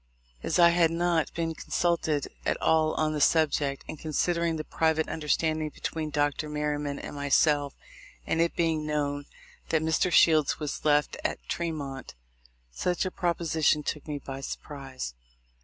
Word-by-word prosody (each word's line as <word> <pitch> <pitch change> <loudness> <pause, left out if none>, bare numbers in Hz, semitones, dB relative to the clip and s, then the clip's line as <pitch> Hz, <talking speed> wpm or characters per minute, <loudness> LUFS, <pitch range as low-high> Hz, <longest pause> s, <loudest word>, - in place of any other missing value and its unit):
As - - 0
I 170 -1 +8
had 170 -1 +4
not 165 -2 +1
been 165 -1 -1
consulted 160 -3 0 0.2
at - - 0
all 160 -1 +2
on 155 0 +1
the 150 - -2
subject, 145 -3 +2
and 155 - -7
con 155 -1 -5
sidering 170 +1 +1
the 155 - -3
private 160 0 +1
understanding 155 0 0
between 155 +1 -4
Dr. 145 +1 0
IVlerryman 150 -1 -2
and - - -7
myself, 145 0 +2 0.5
and 165 - +1
it 170 - +1
being 160 -2 +1
known 145 -1 -2 0.4
that 160 -1 +2
Mr. 160 +3 +1
Shields 155 -4 +5
was 150 -2 -4
left 150 -1 +2
at - - -1
Tremont, 145 - -4 0.6
such 180 - -1
a 185 - -2
proposition 160 -4 +1
took 150 +1 -4
me 150 -1 -3
by 135 -1 -7
surprise. 135 - -6
155 Hz, 155 wpm, -28 LUFS, 145-165 Hz, 0.6 s, I